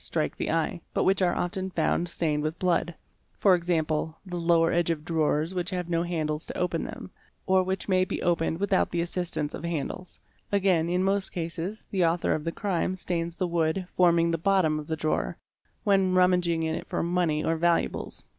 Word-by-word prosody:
strike - - -2
the - - -3
eye, 165 +1 0
but - - +2
which 190 0 +2
are 180 -2 +2
often 185 +2 -2
found 175 -1 0
stained 155 -3 -1
with 155 +2 -2
blood; 175 -2 0 0.4
for 195 - +5
example, 160 -2 0
the 180 -2 -6
lower 165 -1 +3
edge 170 0 +1
of 155 -2 -2
drawers 160 0 +1
which 180 0 -2
have 180 -3 -3
no 165 0 +2
handles 160 -3 -2
to - - -6
open 175 -2 -1
them, - - -8 0.3
or 190 0 +4
which 190 +1 -2
may 185 -2 +3
be 185 - -3
opened 165 -1 +1
without 200 -1 +2
the 175 - -2
assistance 170 -3 -2
of - - -6
handles; 170 +2 -4 0.3
again 185 -5 +2
in 180 +1 +1
most 195 0 0
cases, 170 +4 -4
the 190 -3 +2
author 170 +1 +2
of 155 - -2
the 165 - 0
crime 185 -1 -1
stains 170 -2 -3
the 185 -1 -1
wood 170 +2 0
forming 170 -2 +3
the 165 - -1
bottom 170 -4 +2
of 150 - -8
the 160 -1 -2
drawer, 155 0 -1 0.5
when 195 -3 +3
rummaging 180 -2 +3
it 160 0 -2
for - - -1
money 170 -3 +1
or 165 - +1
valuables. 170 +1 0
170 Hz, 195 wpm, -27 LUFS, 165-185 Hz, 0.5 s, for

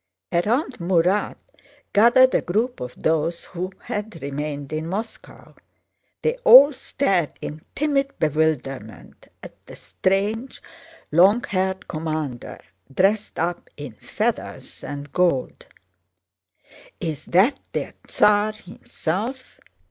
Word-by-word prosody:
Around 230 - 0
Murat 180 +3 +1 0.6
gathered 240 +5 +6
a - - +3
group 225 +8 -1
of 125 0 -6
those 160 +1 0
who 185 +1 -5
had 210 -4 -5
remained 145 0 -5
in 155 +1 -3
Moscow. 210 +6 -7 0.7
They 470 +1 +1
all 295 - +8
stared 195 - -1
in 155 +1 -7
timid 275 -2 0
bewilderment 145 -7 -2 0.2
at - - -13
the - - -10
strange, 205 +6 -2 0.5
long 195 +9 +5
haired 190 -1 -2
commander 155 -6 -4 0.3
dressed 200 +8 +1
up 175 +1 -2
in 145 -5 -7
feathers - - -4
and 145 -1 -7
gold. 175 -7 0 1.3
"Is 155 -3 -4
that 195 +11 +3
their - - -4
Tsar 210 +1 +3
himself? 215 +4 -5
185 Hz, 105 wpm, -23 LUFS, 155-220 Hz, 1.3 s, all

